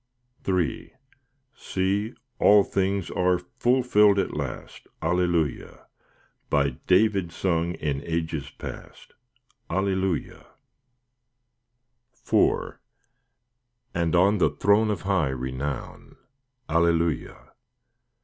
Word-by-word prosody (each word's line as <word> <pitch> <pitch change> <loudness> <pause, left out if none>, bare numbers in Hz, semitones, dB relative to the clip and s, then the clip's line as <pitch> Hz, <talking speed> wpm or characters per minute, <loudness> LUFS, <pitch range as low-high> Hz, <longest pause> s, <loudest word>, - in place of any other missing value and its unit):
III 95 +5 -1 0.6
See, 100 +3 -2 0.2
all 105 0 +6
things 95 -2 -1
are 90 0 +2
fulfilled 105 +1 +2
at 100 - 0
last, 70 -4 -6
Alleluia! 85 -3 -1 0.6
By 70 -1 +2 0.2
David 95 -2 +3
sung 85 0 -1
in 70 -2 -3
ages 80 -4 -3
past, - - -10 0.6
Alleluia! 95 -1 -1 1.9
IV - - +2 1.1
And 85 -1 0
on 100 +4 +4
the - - +4
throne 105 +2 +2
of 105 -5 -2
high 95 -7 +1
renown, 65 +1 -5 0.5
Alleluia! 85 0 0
90 Hz, 80 wpm, -25 LUFS, 80-100 Hz, 1.9 s, all